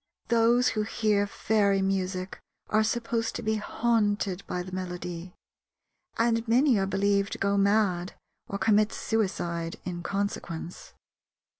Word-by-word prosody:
Those 235 +2 +4
who 215 - -1
hear 210 -1 +1
fairy 200 -2 +1
music 185 -1 -2 0.3
are 215 - +3
supposed 230 0 -1
to - - -4
be 220 0 +1
haunted 210 -3 0
by 180 - -3
the 185 - -9
melody, 180 -1 -5 0.8
and 230 0 +1
many 245 0 +4
are 195 - 0
believed 200 0 +1
to - - -4
go 200 0 +1
mad 200 -3 +2 0.3
or 200 - -3
commit 210 +1 +3
suicide 175 -6 -2
in 175 -1 -4
consequence. 175 -3 -4
200 Hz, 130 wpm, -28 LUFS, 185-220 Hz, 0.8 s, Those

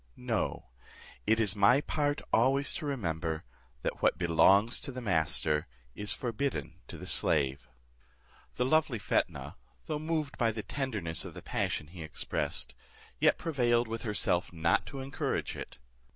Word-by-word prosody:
No, 115 - -2 0.6
it 110 +1 +4
is 105 -2 +2
my 105 +6 +6
part 145 0 -1
always 135 +5 +4
to 155 - -4
remember, 80 - -2 0.4
'that - - -2
what - - +3
belongs 95 +6 +5
to 140 - -5
the 130 - -6
master 80 -7 +1 0.3
is 105 +7 -3
forbidden 130 +3 -2
to - - -8
the - - -8
slave.'" 65 -3 +2 0.9
The 125 - +1
lovely 150 -3 +3
Fetnah, 100 - -1 0.3
though 150 -1 -2
moved 155 -2 -2
by 115 -2 +4
the 110 -1 -4
tenderness 105 -13 -2
of - - -8
the - - -9
passion 75 - -1
he 85 +3 -11
expressed, 80 -1 -3 0.5
yet - - +4
prevailed 120 -6 +1
with 115 0 -4
herself 100 -5 0
not 85 0 +1
to 135 -2 -6
encourage 135 +1 -2
it. - - -8
115 Hz, 150 wpm, -31 LUFS, 85-135 Hz, 0.9 s, my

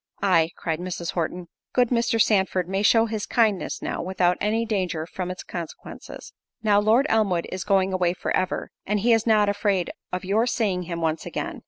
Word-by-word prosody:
"Ay," 170 -5 +4
cried 160 -1 -2
Mrs. 175 -1 -4
Horton, 175 +1 -3 0.3
"good 245 -2 +3
Mr. 235 -1 +1
Sandford 190 -4 +2
may 195 +1 -1
show 225 +2 +5
his 220 -2 -4
kindness 220 -5 +1
now, - - -3
without 180 0 +1
any 220 +2 +1
danger 185 -7 -2
from 180 +1 -5
its 185 - -6
consequences. 170 -3 -8 0.3
Now 205 -2 +4
Lord 220 +6 +3
Elmwood 200 - +1
is 185 -1 -4
going 195 -2 +2
away 180 -2 +1
for - - -2
ever, 185 - -2 0.2
he 210 +4 +2
is 225 0 +1
not 215 -2 +4
afraid 200 -3 0 0.2
of 180 0 -4
your 215 +5 +2
seeing 200 -7 0
him 170 -1 -3
once 160 -1 -1
again." - - -4
195 Hz, 185 wpm, -24 LUFS, 180-220 Hz, 0.3 s, show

